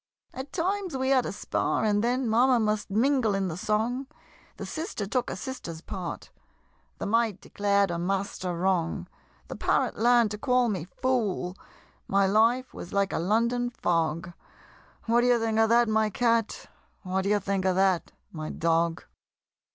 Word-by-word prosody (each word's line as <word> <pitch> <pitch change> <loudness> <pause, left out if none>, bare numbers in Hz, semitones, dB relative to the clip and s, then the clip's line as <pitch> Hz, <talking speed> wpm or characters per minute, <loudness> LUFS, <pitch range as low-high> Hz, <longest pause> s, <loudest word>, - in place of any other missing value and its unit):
At 265 +2 -7
times 375 -2 -1
we 260 0 0
had 260 -2 +3
a - - -3
spar, 200 - -1
and 205 0 +2
then 250 +1 0
Mamma 245 +3 +4
must 215 -1 0
mingle 230 0 +2
in 195 -1 -1
the 160 - -4
song 225 +8 -1 0.5
The - - -6
sister 315 - -4
took 245 +5 -1
a - - -4
sisters 185 -7 -7
part 180 -2 -6 0.7
The - - -4
Maid 225 -2 +1
declared 200 -2 +1
her 170 - -2
Master 190 -1 -2
wrong 175 -2 0 0.4
The - - -6
Parrot - - 0
learn'd 235 -2 +4
to 210 - -5
call 250 -1 +2
me 185 -6 -3
"Fool!" 200 -4 -1 0.5
My 195 0 +3
life 230 +6 +2
was 175 - -8
like 200 -1 +1
a - - 0
London 235 +7 +1
fog 170 -5 -1 0.7
What 235 +1 +3
d'ye 245 0 +4
think 225 -1 0
of 225 0 +4
that, 235 0 +4
my 220 0 +2
Cat? 230 0 0 0.4
What 190 0 -1
d'ye 205 +2 +2
think 195 -1 -2
of 185 -1 +2
that, 190 -2 +2 0.2
my 155 -2 -6
Dog? 165 0 0
215 Hz, 165 wpm, -27 LUFS, 190-245 Hz, 0.7 s, Mamma